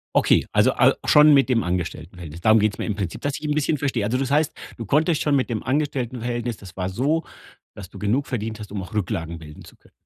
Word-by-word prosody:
Okay, -, -, +3 dB
also -, -, +4 dB
al -, -, +4 dB
schon 150 Hz, 0 st, +7 dB
mit 135 Hz, -1 st, +4 dB
dem 115 Hz, -3 st, +2 dB
Angestelltenverhältnis. 85 Hz, -2 st, -5 dB
Darum 110 Hz, +5 st, +5 dB
geht's 105 Hz, -1 st, 0 dB
mir -, -, -3 dB
im 105 Hz, -, -1 dB
Prinzip, 95 Hz, -5 st, -4 dB
dass 145 Hz, -1 st, -2 dB
ich 150 Hz, -, -6 dB
'n 150 Hz, -, 0 dB
bisschen 150 Hz, +1 st, +1 dB
verstehe. 130 Hz, -6 st, -1 dB
Also 110 Hz, +5 st, 0 dB
das 135 Hz, -1 st, -2 dB
heißt, 150 Hz, +1 st, +2 dB, 0.3 s
du 115 Hz, -, -6 dB
konntest 155 Hz, -, +2 dB
schon 145 Hz, -2 st, +2 dB
mit 130 Hz, -1 st, 0 dB
dem 110 Hz, -3 st, -2 dB
Angestelltenverhältnis 125 Hz, -4 st, -2 dB
das 95 Hz, -3 st, -13 dB
war 90 Hz, -1 st, -2 dB
so, 140 Hz, -, 0 dB, 0.5 s
dass 95 Hz, -2 st, -10 dB
du -, -, -11 dB
genug 120 Hz, +8 st, 0 dB
verdient 110 Hz, -3 st, -4 dB
hast, 105 Hz, -2 st, -9 dB
um 100 Hz, -2 st, -4 dB
auch 95 Hz, -, -10 dB
Rücklagen 85 Hz, -5 st, -3 dB
bilden 75 Hz, -2 st, -12 dB
zu -, -, -16 dB
können. -, -, -25 dB
115 Hz, 240 wpm, -23 LUFS, 95-140 Hz, 0.5 s, schon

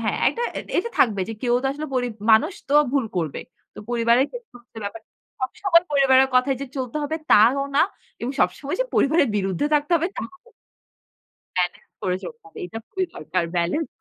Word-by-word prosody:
হ্যাঁ, -, -, 0 dB
এটা 475 Hz, -, -4 dB, 0.4 s
এটা 470 Hz, -, -1 dB
থাকবে 210 Hz, -6 st, +3 dB
যে 225 Hz, -, -4 dB
কেউ 240 Hz, -1 st, +2 dB
তো -, -, 0 dB
আসলে 300 Hz, +2 st, -5 dB
পরি 245 Hz, -1 st, +1 dB, 0.3 s
মানুষ 305 Hz, -, +4 dB, 0.2 s
তো 285 Hz, -, +1 dB, 0.2 s
ভুল 275 Hz, -3 st, +2 dB
করবে। 160 Hz, -5 st, -2 dB, 0.3 s
তো -, -, -12 dB
পরিবারের 235 Hz, +2 st, +3 dB
ক্ষেত্রে 475 Hz, -, -10 dB
হচ্ছে 225 Hz, -1 st, -13 dB
ব্যাপারটা। 220 Hz, +2 st, -7 dB, 0.3 s
সবসময় 335 Hz, +6 st, +2 dB
পরিবারের 265 Hz, -1 st, +5 dB
কথায় 255 Hz, +1 st, +3 dB
যে 275 Hz, -, -4 dB
চলতে 255 Hz, +1 st, -3 dB
হবে 310 Hz, +2 st, -2 dB, 0.2 s
তাও 240 Hz, +7 st, +6 dB
না -, -, +6 dB, 0.4 s
এবং 245 Hz, +3 st, -3 dB
সবসময় 275 Hz, -, 0 dB
যে -, -, +3 dB
পরিবারের 280 Hz, -2 st, +3 dB
বিরুদ্ধে 195 Hz, +5 st, 0 dB
থাকতে 295 Hz, +3 st, +1 dB
হবে 330 Hz, +1 st, 0 dB
তাও 420 Hz, +7 st, -8 dB, 1.1 s
ব্যালেন্স 180 Hz, -1 st, -2 dB
করে 180 Hz, -1 st, 0 dB
চলতে 470 Hz, -1 st, -8 dB
হবে। 410 Hz, -, -12 dB
এটা 225 Hz, -, -7 dB
খুবই 380 Hz, -1 st, -2 dB
দরকার। 175 Hz, +3 st, -2 dB
ব্যালেন্স 175 Hz, -, 0 dB
265 Hz, 180 wpm, -23 LUFS, 225-310 Hz, 1.1 s, তাও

